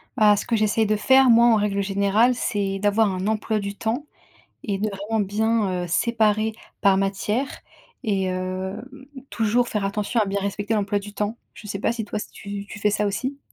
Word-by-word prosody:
Bah, 210 Hz, -3 st, +5 dB
ce 205 Hz, -, -3 dB
que 235 Hz, -, 0 dB
j'essaie 215 Hz, +1 st, +2 dB
de 215 Hz, +1 st, +1 dB
faire, 260 Hz, +5 st, +5 dB
moi, 235 Hz, 0 st, +7 dB
en 230 Hz, -, +5 dB
règle 205 Hz, -1 st, 0 dB
générale, 200 Hz, +5 st, +2 dB
c'est 200 Hz, -5 st, -2 dB
d'avoir 205 Hz, +1 st, +2 dB
un 185 Hz, +2 st, -3 dB
emploi 215 Hz, 0 st, 0 dB
du 200 Hz, 0 st, -5 dB
temps, 230 Hz, +8 st, -2 dB, 0.6 s
et 200 Hz, -3 st, -2 dB
de 215 Hz, +2 st, -1 dB
vraiment 205 Hz, +3 st, -3 dB
bien 205 Hz, -3 st, 0 dB
heu, -, -, -5 dB
séparer 220 Hz, +3 st, +1 dB, 0.3 s
par 195 Hz, -1 st, +4 dB
matière. 205 Hz, +6 st, 0 dB, 0.6 s
Et 195 Hz, -3 st, 0 dB
hem, 185 Hz, +3 st, -3 dB, 0.5 s
toujours 235 Hz, +2 st, +1 dB
faire 210 Hz, -2 st, -2 dB
attention 210 Hz, +3 st, -1 dB
à -, -, +1 dB
bien 200 Hz, 0 st, -1 dB
respecter 200 Hz, +2 st, -2 dB
l'emploi 205 Hz, -1 st, 0 dB
du 205 Hz, +1 st, -10 dB
temps. 210 Hz, +3 st, -2 dB, 0.2 s
Je 210 Hz, -, -12 dB
sais 195 Hz, -, -4 dB
pas -, -, +1 dB
si 230 Hz, -2 st, -4 dB
toi 210 Hz, -, -4 dB
si -, -, -7 dB
tu 200 Hz, 0 st, -7 dB
tu 210 Hz, -, -9 dB
fais 210 Hz, -, +2 dB
ça 210 Hz, +1 st, 0 dB
aussi? 260 Hz, +7 st, -3 dB
210 Hz, 205 wpm, -23 LUFS, 200-220 Hz, 0.6 s, moi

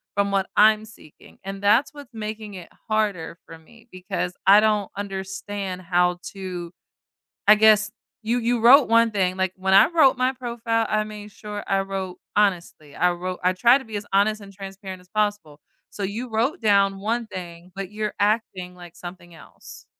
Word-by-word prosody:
from 200 Hz, 0 st, +1 dB
what 195 Hz, -1 st, 0 dB
I'm 215 Hz, 0 st, +5 dB
seeking. 210 Hz, -8 st, -18 dB
And 195 Hz, 0 st, -7 dB
that's 215 Hz, +7 st, +3 dB
what's 285 Hz, -4 st, -13 dB
making 215 Hz, -1 st, -6 dB
it 180 Hz, -2 st, -10 dB, 0.2 s
harder 205 Hz, -7 st, -1 dB
for 165 Hz, -, -12 dB
me 230 Hz, +9 st, -21 dB
because 180 Hz, -1 st, -4 dB
I 200 Hz, +2 st, +8 dB
don't 210 Hz, -2 st, +1 dB
understand 195 Hz, -1 st, -5 dB
how 180 Hz, 0 st, +1 dB, 0.2 s
to 180 Hz, -3 st, -6 dB, 0.8 s
I 210 Hz, -, +10 dB
guess, 215 Hz, 0 st, +5 dB, 0.3 s
you 230 Hz, +3 st, 0 dB
you 240 Hz, 0 st, 0 dB
wrote 255 Hz, +5 st, +7 dB
one 230 Hz, 0 st, +4 dB
thing. 185 Hz, -3 st, 0 dB
Like, 190 Hz, -1 st, -1 dB
when 190 Hz, 0 st, 0 dB
I 195 Hz, -, +8 dB
wrote 315 Hz, -7 st, +4 dB
my 255 Hz, +1 st, +1 dB
profile, 235 Hz, -3 st, -2 dB
I 215 Hz, 0 st, 0 dB
made 210 Hz, -1 st, -9 dB
sure 205 Hz, 0 st, -7 dB
I 195 Hz, -1 st, +1 dB
wrote 195 Hz, -2 st, -5 dB, 0.2 s
honestly. 175 Hz, -7 st, -1 dB
I 180 Hz, +1 st, +2 dB
wrote 180 Hz, +1 st, -5 dB
I 180 Hz, -, +4 dB
try 240 Hz, +8 st, +5 dB
to 270 Hz, -, -11 dB
be 220 Hz, -2 st, -7 dB
as 205 Hz, 0 st, -6 dB
honest 210 Hz, +2 st, +2 dB
and 200 Hz, -1 st, -12 dB
transparent 195 Hz, -1 st, -9 dB
as 180 Hz, -, -22 dB
possible. 205 Hz, -7 st, -2 dB, 0.3 s
So 205 Hz, -, -8 dB
you 220 Hz, +6 st, -4 dB
wrote 230 Hz, +7 st, -1 dB
down 200 Hz, -3 st, +2 dB
one 230 Hz, +3 st, -2 dB
thing, 175 Hz, -2 st, -9 dB
but 195 Hz, -1 st, -5 dB
you're 210 Hz, 0 st, -3 dB
acting 205 Hz, -4 st, -1 dB
like 175 Hz, -1 st, -13 dB
something 175 Hz, -1 st, -11 dB
else. -, -, -14 dB
200 Hz, 185 wpm, -23 LUFS, 185-220 Hz, 0.8 s, I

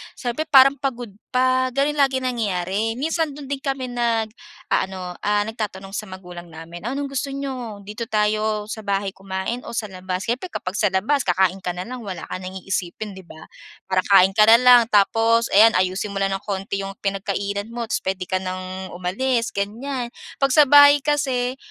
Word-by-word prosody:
siyempre 250 Hz, +5 st, -3 dB
parang 275 Hz, 0 st, +7 dB
pagod 250 Hz, -4 st, -3 dB, 0.2 s
pa, 255 Hz, 0 st, +2 dB
gano'n 280 Hz, +3 st, +1 dB
lagi 270 Hz, -2 st, +3 dB
nangyayari. 215 Hz, -4 st, -1 dB
Minsan 320 Hz, +1 st, 0 dB
do'n 280 Hz, -1 st, -9 dB
din 280 Hz, -, -1 dB
kami 270 Hz, -3 st, -2 dB
nag-aano 225 Hz, -, -3 dB
ah, 205 Hz, 0 st, +2 dB
nagtatanong 210 Hz, -4 st, -5 dB
sa -, -, -3 dB
magulang 180 Hz, -2 st, -9 dB
namin, 165 Hz, +2 st, -10 dB
"Anong 275 Hz, +4 st, -2 dB
gusto 275 Hz, 0 st, -3 dB
n'yo, 255 Hz, -6 st, -5 dB
dito 210 Hz, +3 st, -5 dB
tayo 215 Hz, -1 st, 0 dB
sa 220 Hz, 0 st, -6 dB
bahay 200 Hz, 0 st, 0 dB
kumain 195 Hz, +5 st, -4 dB
o -, -, -7 dB
sa 225 Hz, -2 st, -2 dB
labas?" 185 Hz, 0 st, -5 dB
Siyempre 245 Hz, +8 st, -1 dB
kapag 180 Hz, +2 st, -4 dB
sa 210 Hz, -3 st, +2 dB
labas 250 Hz, +9 st, +1 dB
kakain 185 Hz, +1 st, +2 dB
ka 180 Hz, -, -1 dB
na 180 Hz, +3 st, -6 dB
lang, 250 Hz, -2 st, -7 dB
wala 185 Hz, -3 st, -6 dB
ka -, -, -4 dB
nang 185 Hz, 0 st, -7 dB
iisipin, 190 Hz, +2 st, -4 dB
'di 190 Hz, -, -10 dB
ba, 160 Hz, -1 st, -13 dB, 0.4 s
para 185 Hz, -1 st, +2 dB
kain 190 Hz, -1 st, +7 dB
ka 215 Hz, -, +6 dB
na 225 Hz, +1 st, +7 dB
lang 250 Hz, -1 st, +8 dB
tapos 225 Hz, +3 st, +3 dB
ayan 225 Hz, +3 st, +7 dB
ayusin 185 Hz, +2 st, 0 dB
mo 195 Hz, -, -3 dB
lang 195 Hz, -, +2 dB
ng 195 Hz, -, -7 dB
konti 195 Hz, 0 st, -3 dB
yung 195 Hz, -, -6 dB
pinagkainan 200 Hz, +1 st, -2 dB
mo 235 Hz, -2 st, -4 dB
tapos -, -, -1 dB
puwede 190 Hz, -1 st, -3 dB
ka 185 Hz, -, +1 dB
nang 185 Hz, 0 st, -6 dB
umalis 230 Hz, +7 st, -1 dB
ganyan. 235 Hz, +5 st, -3 dB, 0.3 s
'Pag 275 Hz, -1 st, +2 dB
sa 295 Hz, -1 st, +6 dB
bahay 285 Hz, 0 st, +8 dB
kasi 265 Hz, -3 st, 0 dB
215 Hz, 185 wpm, -22 LUFS, 190-255 Hz, 0.4 s, lang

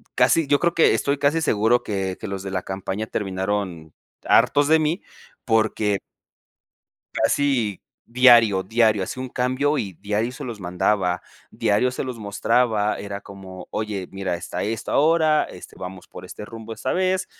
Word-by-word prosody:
casi 165 Hz, -4 st, +3 dB
yo 145 Hz, 0 st, +3 dB
creo 170 Hz, -1 st, +1 dB
que 165 Hz, -, +4 dB
estoy 140 Hz, 0 st, 0 dB
casi 150 Hz, +3 st, +2 dB
seguro 115 Hz, -4 st, +2 dB
que 95 Hz, -2 st, -3 dB
que 110 Hz, -, -6 dB
los 95 Hz, -1 st, -4 dB
de 95 Hz, -, -5 dB
la 95 Hz, -1 st, -2 dB
campaña 95 Hz, +2 st, -4 dB
terminaron 95 Hz, -4 st, -3 dB, 0.3 s
hartos 145 Hz, 0 st, +4 dB
de 160 Hz, +1 st, +5 dB
mí 155 Hz, +5 st, 0 dB, 0.4 s
porque 110 Hz, -2 st, +1 dB, 1.2 s
casi 125 Hz, -9 st, +1 dB, 0.2 s
diario, 115 Hz, -6 st, +5 dB
diario 110 Hz, -1 st, +2 dB
hacía 130 Hz, +7 st, -5 dB
un 130 Hz, -, -5 dB
cambio 130 Hz, +5 st, 0 dB
y 100 Hz, -7 st, -3 dB
diario 105 Hz, +7 st, -2 dB
se 145 Hz, +3 st, -8 dB
los 115 Hz, -5 st, -6 dB
mandaba, 90 Hz, 0 st, 0 dB, 0.3 s
diario 105 Hz, +5 st, +1 dB
se -, -, -4 dB
los 130 Hz, -3 st, -5 dB
mostraba. 105 Hz, +1 st, +1 dB
Era 100 Hz, 0 st, -6 dB
como: 95 Hz, -2 st, -11 dB
"Oye, 105 Hz, -4 st, -3 dB
mira, 95 Hz, -2 st, -3 dB
está 90 Hz, +1 st, -5 dB
esto 110 Hz, +1 st, -3 dB
ahora, 155 Hz, 0 st, +3 dB
este, -, -, -12 dB
vamos 90 Hz, 0 st, -8 dB
por -, -, -11 dB
este 105 Hz, -, -9 dB
rumbo 115 Hz, 0 st, -8 dB
esta 130 Hz, -, -3 dB
vez". 185 Hz, 0 st, +1 dB
110 Hz, 160 wpm, -23 LUFS, 95-130 Hz, 1.2 s, de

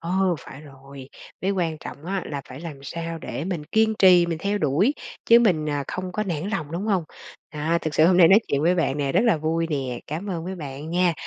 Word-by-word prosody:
Ờ, 185 Hz, +1 st, +1 dB
phải 135 Hz, -, -11 dB
rồi. 135 Hz, -2 st, -13 dB, 0.3 s
Cái 190 Hz, -, 0 dB
quan 170 Hz, -5 st, -1 dB
trọng 145 Hz, -, -10 dB
á 190 Hz, +1 st, -2 dB
là 145 Hz, -2 st, -4 dB
phải 130 Hz, +2 st, -9 dB
làm 155 Hz, -5 st, -8 dB
sao 165 Hz, +3 st, -5 dB
để 150 Hz, -, -5 dB
mình 175 Hz, -5 st, -3 dB
kiên 220 Hz, +6 st, +2 dB
trì, 180 Hz, -2 st, +6 dB
mình 165 Hz, -2 st, -3 dB
theo 200 Hz, +4 st, -1 dB
đuổi 175 Hz, -, +2 dB, 0.3 s
chứ 235 Hz, -, +8 dB
mình, 180 Hz, -10 st, +2 dB
à, 145 Hz, -1 st, -2 dB
không 185 Hz, 0 st, -5 dB
có 215 Hz, -, -1 dB
nản 180 Hz, -2 st, -3 dB
lòng, 165 Hz, -8 st, -3 dB
đúng 185 Hz, +6 st, -3 dB
hông? 190 Hz, -6 st, +1 dB, 0.5 s
À, 160 Hz, +3 st, 0 dB
thực 155 Hz, -2 st, -3 dB
sự 155 Hz, +2 st, +5 dB
hôm 180 Hz, -, +4 dB
nay 170 Hz, -2 st, +7 dB
nói 195 Hz, -, +8 dB
chuyện 140 Hz, +1 st, 0 dB
với 175 Hz, +2 st, +3 dB
bạn 150 Hz, -5 st, 0 dB
nè, 140 Hz, -2 st, -1 dB
rất -, -, +4 dB
là 225 Hz, -8 st, +4 dB
vui 160 Hz, +2 st, -1 dB
nè, 130 Hz, -4 st, -3 dB
cám 175 Hz, +7 st, -5 dB
ơn 165 Hz, -2 st, -4 dB
với 185 Hz, +2 st, -4 dB
bạn 145 Hz, -2 st, -7 dB
nha. 175 Hz, 0 st, +2 dB
165 Hz, 245 wpm, -24 LUFS, 150-185 Hz, 0.5 s, chứ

